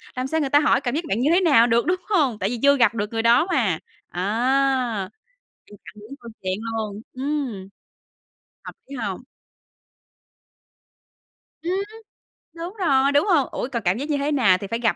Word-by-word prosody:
Làm 255 Hz, +1 st, -2 dB
sao 320 Hz, +3 st, -1 dB
người 280 Hz, -, -1 dB
ta 290 Hz, +2 st, +5 dB
hỏi 285 Hz, -2 st, +2 dB
cảm 245 Hz, +1 st, -2 dB
giác 335 Hz, -, -1 dB
bạn 200 Hz, -, -1 dB
như 275 Hz, +5 st, +2 dB
thế 360 Hz, -, +4 dB
nào 275 Hz, -10 st, +5 dB
được, 235 Hz, 0 st, +2 dB
đúng 365 Hz, +1 st, +1 dB
hông? 280 Hz, -, +1 dB
Tại 195 Hz, -, -1 dB
vì 240 Hz, 0 st, -4 dB
chưa 280 Hz, 0 st, +5 dB
gặp 230 Hz, -4 st, +4 dB
được 205 Hz, -1 st, -2 dB
người 225 Hz, -, 0 dB
đó 235 Hz, +8 st, +4 dB
mà. 200 Hz, -, +1 dB, 0.3 s
Á, 235 Hz, +1 st, 0 dB, 0.6 s
mình 205 Hz, -, -13 dB
chặn -, -, -11 dB
đứng 225 Hz, +6 st, -10 dB
câu 235 Hz, -1 st, -10 dB
chuyện 185 Hz, 0 st, -1 dB, 0.2 s
luôn. 215 Hz, -1 st, -5 dB
Ừm. 260 Hz, -8 st, -3 dB, 1.0 s
Hợp -, -, -8 dB, 0.2 s
lý 280 Hz, -, -7 dB
hông? 205 Hz, -6 st, -4 dB, 2.4 s
Ừm. 350 Hz, +2 st, -2 dB, 0.8 s
Đúng 340 Hz, +3 st, -7 dB
rồi, 280 Hz, -8 st, +2 dB
đúng 285 Hz, +1 st, +3 dB
hông? 325 Hz, -9 st, +3 dB
Ủa, -, -, -3 dB
còn 235 Hz, -3 st, -3 dB
cảm 180 Hz, +2 st, +1 dB
giác 285 Hz, +5 st, -5 dB
như 290 Hz, -, +1 dB
thế 285 Hz, +2 st, -1 dB
nào 225 Hz, -10 st, +4 dB
thì 200 Hz, +1 st, -7 dB
phải 230 Hz, +3 st, -3 dB
gặp 230 Hz, -2 st, +1 dB
250 Hz, 195 wpm, -22 LUFS, 220-285 Hz, 2.4 s, ta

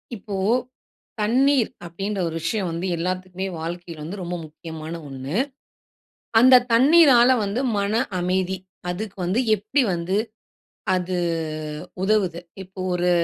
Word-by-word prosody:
இப்போ 200 Hz, 0 st, -6 dB, 0.9 s
தண்ணீர் 255 Hz, +3 st, +3 dB, 0.2 s
அப்பிடின்ற 195 Hz, +4 st, -4 dB
ஒரு 165 Hz, -, -4 dB
விஷயம் 190 Hz, +1 st, -1 dB
வந்து 170 Hz, +2 st, -3 dB
எல்லாத்துக்குமே 185 Hz, +2 st, -3 dB
வாழ்க்கையில 170 Hz, -1 st, -6 dB
வந்து 185 Hz, +5 st, -6 dB
ரொம்ப 175 Hz, 0 st, -3 dB
முக்கியமான 160 Hz, +1 st, -8 dB
ஒண்ணு. 135 Hz, +3 st, -6 dB, 1.1 s
அந்த 255 Hz, +1 st, +8 dB
தண்ணீரால 260 Hz, -1 st, +7 dB
வந்து 205 Hz, +5 st, -1 dB, 0.2 s
மன 205 Hz, +4 st, +1 dB, 0.2 s
அமைதி, 185 Hz, +1 st, 0 dB, 0.3 s
அதுக்கு 200 Hz, +3 st, -5 dB
வந்து 185 Hz, +7 st, +1 dB
எப்பிடி 215 Hz, +7 st, +1 dB
வந்து 175 Hz, +3 st, -1 dB, 0.8 s
அது 180 Hz, 0 st, -1 dB, 0.9 s
உதவுது. 190 Hz, -4 st, +1 dB, 0.2 s
இப்போ 190 Hz, +1 st, -14 dB
ஒரு 180 Hz, 0 st, +1 dB
185 Hz, 115 wpm, -23 LUFS, 175-215 Hz, 1.1 s, அந்த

